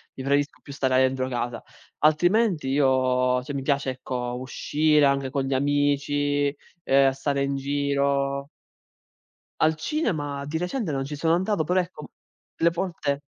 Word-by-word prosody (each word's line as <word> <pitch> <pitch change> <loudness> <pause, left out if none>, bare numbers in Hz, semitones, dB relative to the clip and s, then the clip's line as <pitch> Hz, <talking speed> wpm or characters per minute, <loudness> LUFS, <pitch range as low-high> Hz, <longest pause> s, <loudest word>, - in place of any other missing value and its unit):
lì 130 - -6
preferisco 140 +1 0
più 140 - -10
stare 130 -2 +1
dentro 130 0 0
casa. 120 -1 -3 0.4
Altrimenti 175 +2 +3
io 130 -2 +2
cioè, 145 - -6
mi 135 - -3
piace, 140 -1 0
ecco, 125 -1 -4
uscire 150 +3 +2
anche 140 -1 +1
con 140 -1 -1
gli 135 - -1
amici, 145 0 +1 0.3
uhm, 135 0 +5
stare 140 +1 -2
in 140 0 -1
giro 140 0 0 1.1
Al 160 0 +4
cinema 150 - -2
di 160 +2 -3
recente 180 - -2
non 135 -1 -1
ci 145 +1 -6
sono 165 +3 +2
andato, 190 -1 0
però 180 +4 +2
ecco, 175 -4 -7 0.5
delle 170 +1 +3
volte 165 -5 -2
140 Hz, 150 wpm, -25 LUFS, 135-155 Hz, 1.1 s, uhm